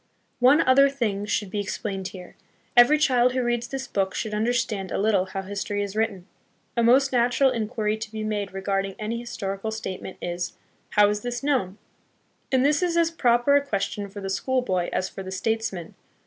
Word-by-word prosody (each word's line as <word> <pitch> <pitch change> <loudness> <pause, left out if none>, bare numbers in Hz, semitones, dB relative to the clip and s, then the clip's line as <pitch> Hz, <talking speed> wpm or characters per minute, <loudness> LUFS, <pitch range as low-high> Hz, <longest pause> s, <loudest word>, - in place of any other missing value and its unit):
One 260 +5 +6
other 275 +2 +5
thing 210 -7 -2
should 205 -1 -1
be 205 - -2
explained 195 -1 -3
here. 180 -2 -11 0.4
Every 245 +5 +7
child 255 -4 +3
who 255 -1 0
reads 240 0 -1
this 270 +1 -4
book 195 -5 -1
should 215 -2 -3
understand 220 -3 -1
a - - -1
little 200 -2 +2
how 195 +1 -5
history 205 +1 -3
is 200 0 -6
written. 210 -5 -1 0.5
A 235 - +2
most 260 +4 +4
nat 245 -1 +2
ural 270 -1 +5
inquiry 215 -2 -1
to 220 -1 -7
be 220 -1 -4
made 210 -2 -2
regarding 195 0 -2
any 220 +2 -3
historical 205 -3 -4
state 220 -4 -5
ment 190 - -8
is, 175 0 -4 0.4
"How 210 0 +5
is 210 0 -1
this 245 +2 -4
known?" 250 -10 0 0.7
And 260 0 +3
this 295 +3 +3
is 345 -2 +1
as 335 -1 +3
proper 245 -2 +3
a 285 - +5
question 200 -4 -3
for 200 +1 -8
the 195 0 -3
school 260 +5 0
boy 185 -6 -1
as 185 - -1
for 195 - -8
the 190 0 -7
statesman. 210 -3 -2
220 Hz, 200 wpm, -25 LUFS, 195-245 Hz, 0.7 s, Every